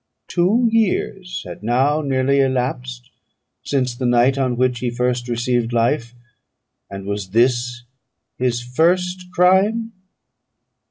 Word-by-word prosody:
Two 205 +8 +2
years 195 -4 -1
had 90 -2 -9
now 130 +7 +1
nearly 140 -1 +1
elapsed 60 - -2 0.5
since 130 -3 -1
the 125 +1 -2
night 120 +2 +3
on 130 -3 -1
which 125 -1 +1
he 125 - -1
first 125 0 -1
received 120 0 -1
life; 120 0 0 0.7
and 100 0 -8
was 100 -1 -4
this 120 +2 +1 0.5
his 120 -1 -1
first 180 +8 0
crime? 195 +6 +3
125 Hz, 115 wpm, -20 LUFS, 120-160 Hz, 0.7 s, night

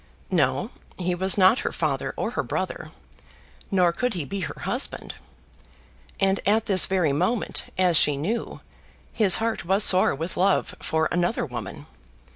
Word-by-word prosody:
No! - - 0 0.3
He 180 -1 -1
was 190 +3 +2
not 190 +5 +5
her - - -3
father - - -2
or - - -2
her - - -2
brother; - - -4 0.8
nor 180 -4 +2
could 245 +5 -2
he 165 -5 -3
be 200 +6 -5
her 185 - -6
husband. - - -2 1.1
And 195 0 +2
at 215 +3 +1
this 190 -4 +5
very 180 -7 +1
moment, 185 +10 -1
as 180 -3 +3
she 145 -1 +3
knew, 205 +12 -4 0.5
his 200 -4 +4
heart 225 0 -2
was 195 +4 +2
sore 185 -7 +4
with 165 +5 -5
love 190 +2 +1
for 160 0 -1
another 175 +5 0
woman. - - -8
185 Hz, 155 wpm, -24 LUFS, 175-200 Hz, 1.1 s, not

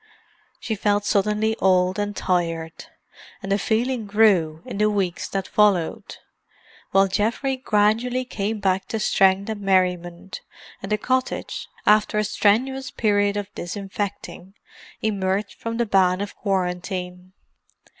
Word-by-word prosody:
She 225 - -3
felt 205 0 0
suddenly 210 +2 +1
old 185 +1 +2
and 205 0 -2
tired; 165 -3 -2 0.6
and 195 - -4
the 200 - +2
feeling 230 +2 -1
grew 190 -7 +3
in 200 - -6
the 210 0 +3
weeks 195 -4 -2
that 195 -1 -3
followed, 205 -6 +1 0.7
while 195 0 +4
Geoffrey 230 +7 0
gradually 240 +1 +1
came 215 -2 -3
back 190 -1 0
to 225 - -3
strength 195 -1 +3
and 215 -2 -4
merriment, 180 -2 0 0.4
and 195 - -7
the 210 - +3
cottage, 255 +4 -2 0.2
after 210 0 +3
a 210 - +2
strenuous 255 +6 +1
period 205 -2 +1
of 205 -1 -5
disinfecting, 195 +1 -6 0.5
emerged 200 -1 -1
from 230 0 -4
the 235 - +1
ban 185 -3 +3
of 205 -1 -5
quarantine. 180 -1 -3
200 Hz, 130 wpm, -23 LUFS, 185-215 Hz, 0.7 s, while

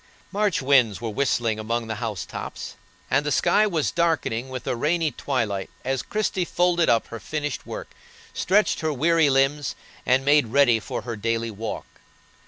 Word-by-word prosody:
March 200 -6 0
winds 130 -7 +4
were 115 -1 -4
whistling 115 -3 0
among 115 +2 -2
the 110 -1 -4
house 110 -8 -3
tops, - - -7 0.4
and 145 +3 +3
the 150 - -2
sky 215 +8 +3
was 165 -7 0
darkening 155 -8 0
with 130 -1 -6
a - - -1
rainy 155 +5 +1
twilight 110 -11 -2 0.2
as 135 0 0
Christie 210 -3 -1
folded 175 -1 +2
up 115 - +3
her 115 - -6
finished 150 -1 -4
work, - - -7 0.4
stretched 205 +3 +2
her 160 -1 -1
weary 160 +2 +3
limbs, 135 +2 +1 0.3
and 130 +2 +2
made 145 -3 +4
ready 120 -1 +4
for - - -5
her 120 -2 -4
daily 115 +1 -1
walk. 110 +1 -5
135 Hz, 170 wpm, -24 LUFS, 115-160 Hz, 0.4 s, winds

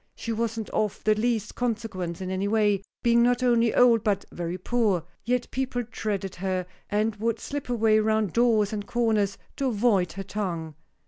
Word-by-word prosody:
She 230 - -5
wasn't 225 -1 -2
of 210 -2 -1
the 215 - +4
least 220 -1 -1
consequence 210 -8 -3
in 185 0 -3
any 190 +1 -1
way, 205 -2 +2 0.2
being 235 -1 +4
not 245 +1 +3
only 235 -2 +4
old 235 -3 +5
but 200 -3 0
very 175 +1 -4
poor; 205 -3 +1 0.2
yet 245 +1 0
people 255 -2 -2
dreaded 195 -4 -3
her, 185 0 -1 0.2
and 215 +1 +1
would 225 +1 -1
slip 285 +1 -5
away 220 -2 +3
round 215 -3 +1
doors 225 -3 +3
and 205 -1 -4
corners 220 -4 +1 0.2
to 275 - 0
avoid 205 -7 +2
her 195 +2 -5
tongue. 175 -6 -4
215 Hz, 175 wpm, -26 LUFS, 195-235 Hz, 0.2 s, old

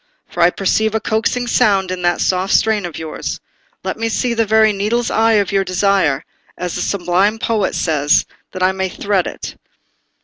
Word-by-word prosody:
For 175 - -4
I 170 - +6
perceive 220 +4 0
a - - +2
coaxing 225 +3 -1
sound 195 -5 +2
in 185 -1 -4
that 175 0 +1
soft 185 +1 +1
strain 215 -4 +2
of 170 - -9
yours. 160 -1 -5 0.4
Let - - -3
me 225 0 -1
see 240 +2 0
the 225 -1 0
very 220 0 +4
needle's 220 +4 -1
eye 225 0 +3
of 205 -2 +2
your 195 -1 +2
desire, 185 -6 +1 0.3
as 180 -1 -4
the - - -3
sublime 195 +3 +1
poet 220 -3 -1
says, 150 -3 +2 0.3
that 185 - -3
I 185 - +4
may 190 0 -2
thread 195 0 -1
it." - - -7
195 Hz, 190 wpm, -17 LUFS, 180-220 Hz, 0.4 s, I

